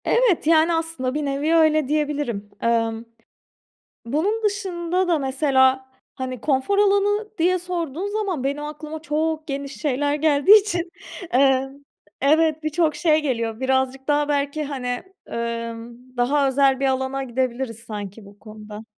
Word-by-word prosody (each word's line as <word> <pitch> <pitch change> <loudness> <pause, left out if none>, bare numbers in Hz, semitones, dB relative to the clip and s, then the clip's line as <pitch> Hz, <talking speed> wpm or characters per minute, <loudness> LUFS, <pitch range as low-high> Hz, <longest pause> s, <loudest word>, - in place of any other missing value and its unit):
Evet, 460 -11 +2
yani, 325 +1 +4
aslında 325 -6 -2
bir 300 0 -2
nevi 285 +4 0
öyle 310 -3 +4
diyebilirim. 290 -8 -2
Emm, 230 -1 0 1.0
bunun 370 - 0
dışında 370 -3 -1
da 335 -3 +3
mesela, 265 -1 +2 0.2
hani, 255 -2 -5
konfor 275 - +1
alanı 410 +1 +2
diye 360 +3 +2
sorduğun 345 -1 -4
zaman, 405 -9 -2
benim 285 +2 -2
aklıma 305 +1 -7
çok 315 0 -1
geniş 275 -1 -5
şeyler 290 0 0
geldiği 310 +7 +6
için, 355 -4 -3 0.4
eee, 265 0 +4 0.5
evet 315 +2 +3
birçok 310 0 +1
şey 315 -3 +2
geliyor. 230 -5 -2
Birazcık 265 +1 0
daha 295 0 +2
belki, 285 +1 -1
hani, 275 -3 -5 0.4
emm, 230 0 -5 0.2
daha 275 +3 +2
özel 270 0 +3
bir 275 - +2
alana 265 +1 -1
gidebiliriz 250 -2 -2
sanki 210 -2 -8
bu 200 +1 -16
konuda. 215 0 -10
285 Hz, 135 wpm, -22 LUFS, 260-325 Hz, 1.0 s, geldiği